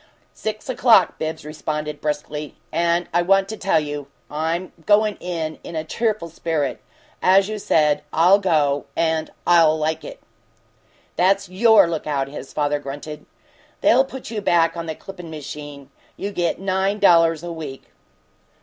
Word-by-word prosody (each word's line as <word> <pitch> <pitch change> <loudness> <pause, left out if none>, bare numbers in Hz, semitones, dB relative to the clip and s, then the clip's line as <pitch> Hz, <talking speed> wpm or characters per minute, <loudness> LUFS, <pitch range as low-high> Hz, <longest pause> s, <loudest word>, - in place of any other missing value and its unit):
"Six 215 -1 -5
o'clock," 235 -7 +4
Bibbs 160 -1 -4
responded, 150 -1 -4
briskly. 150 0 -4 0.2
"And 170 +1 +1
I 175 - +3
want 195 +2 +3
to 220 - -4
tell 195 -5 +2
you 145 -2 -5 0.2
I'm 165 +4 -2
going 210 0 +4
in 165 -3 -4
a 160 -2 -4
'cheerful 215 +1 -1
spirit.' 155 -4 -2 0.4
As 190 +1 +5
you 215 0 -4
said, 150 -6 +2
I'll 180 +5 +5
go 150 -7 +1
and 160 -1 0 0.2
I'll 165 -3 +5
'like 155 +1 -2
it'!" - - -9 1.0
"That's 195 +1 +2
YOUR 210 +1 +5
lookout!" 150 -4 -2
his 140 -1 -9
father 145 -1 0
grunted. 145 +2 -8 0.5
"They'll 255 +3 +5
put 265 -3 -9
you 215 -2 -3
back 165 -3 +2
on 170 -1 -5
the 160 - -4
clippin' 180 -2 -10
machine. 145 -2 -8 0.3
You 200 - -4
get 175 -3 -1
nine 195 +1 0
dollars 165 -5 +4
a 175 - -5
week." 150 -5 -7
165 Hz, 150 wpm, -21 LUFS, 150-195 Hz, 1.0 s, As